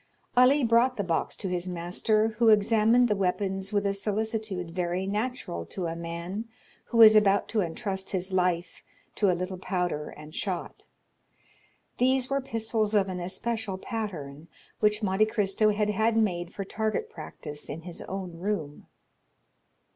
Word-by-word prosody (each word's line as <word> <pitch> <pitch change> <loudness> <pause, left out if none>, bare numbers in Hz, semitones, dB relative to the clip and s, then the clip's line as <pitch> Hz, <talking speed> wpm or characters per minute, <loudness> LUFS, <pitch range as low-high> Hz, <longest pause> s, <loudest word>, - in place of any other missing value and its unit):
Ali 260 +3 +5
brought 235 +2 +3
the 205 - 0
box 170 -3 -1
to 195 - -5
his 180 0 -2
master, 185 +5 +1
who 230 -2 +5
examined 225 +3 +4
the 210 - +1
weapons 195 +1 -1
with 205 -1 +1
a 200 - +1
solicitude 210 -3 -2
very 180 +1 -1
natural 210 - -3
to 185 - -4
a 165 0 -3
man 170 +5 -5 0.4
who 230 -2 +6
is 215 0 +9
about 200 -2 +4
to 220 - +1
intrust 190 +2 -2
his 185 0 -2
life 180 -2 0 0.3
to 205 - +2
a 180 - +2
little 185 +1 -4
powder 180 -5 -2
and 150 +1 -12
shot. 185 -2 -4 1.1
These 260 +1 +2
were 275 0 +1
pistols 220 -3 -1
of 195 -2 +3
an 185 -1 -4
especial 195 +3 -3
pattern, 170 - -5 0.3
which 210 +1 +2
Monte 200 +2 +3
Cristo 215 -1 +2
had 210 0 +1
had 220 +2 +1
made 175 -6 0
for 200 - -5
target 220 - -2
practice 150 - -8
in 165 - -5
his 175 -1 -7
own 185 -3 -6
room. 175 -7 -3
200 Hz, 155 wpm, -28 LUFS, 180-220 Hz, 1.1 s, is